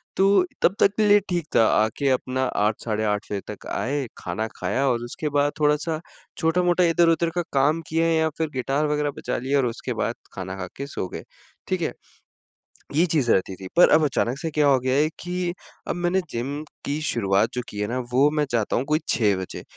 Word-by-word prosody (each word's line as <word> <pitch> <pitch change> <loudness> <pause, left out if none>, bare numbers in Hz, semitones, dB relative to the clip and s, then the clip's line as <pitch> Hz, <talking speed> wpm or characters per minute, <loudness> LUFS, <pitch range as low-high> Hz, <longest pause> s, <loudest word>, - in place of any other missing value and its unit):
तो 195 -1 +4 0.2
तब 190 - +3
तक 200 - +5
के 215 -1 +3
लिए 205 0 +7
ठीक 175 -3 -1
था, 115 - +6
आके 110 +6 +2
अपना 130 0 0 0.2
8 105 0 +2
साढ़े 110 -1 -1
8 105 -1 0
फे 100 -1 -2
तक - - -11
आए, 140 +1 -1
खाना 110 +1 -3
खाया 135 +2 0
और 120 -1 0
उसके 150 +5 -4
बाद 145 0 +2
थोड़ा-सा 150 +2 +1 0.4
छोटा-मोटा 175 +2 +2
इधर-उधर 170 0 +3
का 175 - +1
काम 150 +4 +2
किया 165 +1 +1
या 160 -1 +2
फ़िर 160 -2 -1
गिटार 135 +4 0
वगैरह 150 -1 0
बजा - - -3
लिया 135 +3 0
और 130 - +2
उसके 115 - -3
बाद - - -2 0.2
खाना 95 0 -5
खा 90 -1 -5
के 140 +1 -5
सो 95 - -4
गए। - - -7 0.4
ठीक - - -1
है? - - -1 1.0
ये 165 +4 +4
चीज़ 145 -8 +1
रहती 95 0 +1
थी, 95 - -9
पर 175 - +8
अब 155 0 +5
अचानक 135 -2 0
से 160 - -3
क्या 150 -1 +2
हो 135 -2 +5
गया 130 +1 0
है 150 +2 +3
कि 180 0 -2 0.4
अब - - -1
मैंने 175 +2 +1
जिम 140 +6 -3 0.2
की 145 +2 -2
शुरुआत 100 -4 +1
जो 125 - -2
की 105 - -8
है 105 - 0
ना 125 +2 -2
वो 135 +4 +5
मैं 150 -1 +1
चाहता 115 -3 0
हूँ 125 - 0
कोई 155 +1 +2
6 105 -5 +2
बजे, 95 -1 -6
145 Hz, 215 wpm, -24 LUFS, 120-165 Hz, 1.0 s, पर